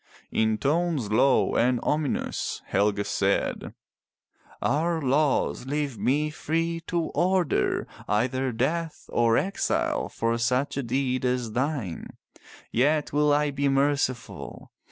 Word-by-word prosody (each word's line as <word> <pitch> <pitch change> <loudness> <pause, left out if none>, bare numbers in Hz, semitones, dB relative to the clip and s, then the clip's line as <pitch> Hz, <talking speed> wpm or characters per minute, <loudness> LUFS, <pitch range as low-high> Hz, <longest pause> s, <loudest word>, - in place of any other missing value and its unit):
In 110 -1 +1
tones 150 -3 0
low 130 +5 +3
and 125 0 +3
ominous 150 -2 -1
Helge 100 0 +1
said: 100 0 -1 0.8
Our 165 +5 +1
laws 140 -2 +1
leave 145 -3 -2
me 150 +4 +1
free 165 +2 -1
to 170 -2 -1
order 180 - +1 0.2
either 130 +5 0
death 155 +8 -2
or 115 -1 +3
exile 195 +1 0
for 115 +1 -1
such 125 +4 0
a 140 - -1
deed 130 +1 -1
as 125 -3 0
thine. 125 - -3 0.5
Yet 145 +5 +1
will 150 0 +3
I 145 0 +2
be 140 0 0
merciful. 135 -3 -1
135 Hz, 115 wpm, -26 LUFS, 120-150 Hz, 0.8 s, low